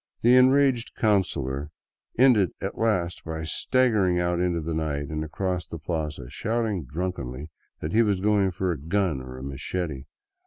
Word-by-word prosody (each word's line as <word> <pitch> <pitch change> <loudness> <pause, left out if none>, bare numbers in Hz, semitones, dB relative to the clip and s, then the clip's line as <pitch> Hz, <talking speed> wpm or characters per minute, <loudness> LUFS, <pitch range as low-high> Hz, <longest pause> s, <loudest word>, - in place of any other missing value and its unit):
The 120 +2 +6
enraged 130 -1 +4
coun 105 -3 +4
cilor 70 -2 -4 0.5
ended 115 - +5
at - - -4
last 90 -6 0
by 80 -1 -5
staggering 100 - +2
out 85 0 0
into 90 -1 +1
the 80 +1 -3
night 75 -3 -2
and 75 0 -2
across 90 +1 -3
the 80 - -6
plaza, 75 -5 -4
shouting 110 - -2
drunkenly 75 -2 -4 0.3
that 75 - -3
he 115 - +5
was 100 -4 +2
going 100 -1 +3
for 95 0 -1
a 80 - -3
gun 80 -2 0
or 65 0 -9
a 65 - -8
machete. 70 +2 -4
90 Hz, 165 wpm, -26 LUFS, 75-105 Hz, 0.5 s, The